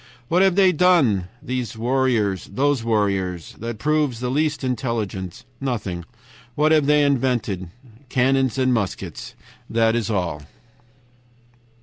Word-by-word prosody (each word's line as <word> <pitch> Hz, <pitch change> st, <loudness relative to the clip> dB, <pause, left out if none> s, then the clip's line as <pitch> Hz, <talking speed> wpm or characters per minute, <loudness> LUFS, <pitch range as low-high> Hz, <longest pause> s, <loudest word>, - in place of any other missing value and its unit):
"What 175 Hz, +2 st, +3 dB
have 190 Hz, -2 st, +4 dB
they 190 Hz, -2 st, +5 dB
done, 150 Hz, -, +3 dB, 0.2 s
those 125 Hz, -4 st, -3 dB
warriors, 115 Hz, -5 st, +1 dB
that 110 Hz, -, -1 dB
proves 150 Hz, -2 st, 0 dB
the 125 Hz, 0 st, -2 dB
least 150 Hz, +1 st, 0 dB
intelligence? 110 Hz, -6 st, -3 dB
Nothing. 105 Hz, -10 st, -3 dB, 0.5 s
What 155 Hz, +1 st, +3 dB
have 155 Hz, -3 st, +4 dB
they 150 Hz, 0 st, +4 dB
invented? 120 Hz, -10 st, 0 dB, 0.4 s
Cannons 130 Hz, 0 st, +2 dB
and 130 Hz, -1 st, +2 dB
muskets. 95 Hz, -6 st, -4 dB, 0.3 s
That 115 Hz, 0 st, +2 dB
is 115 Hz, -3 st, -1 dB
all. 90 Hz, -8 st, -1 dB
120 Hz, 110 wpm, -22 LUFS, 105-140 Hz, 0.5 s, they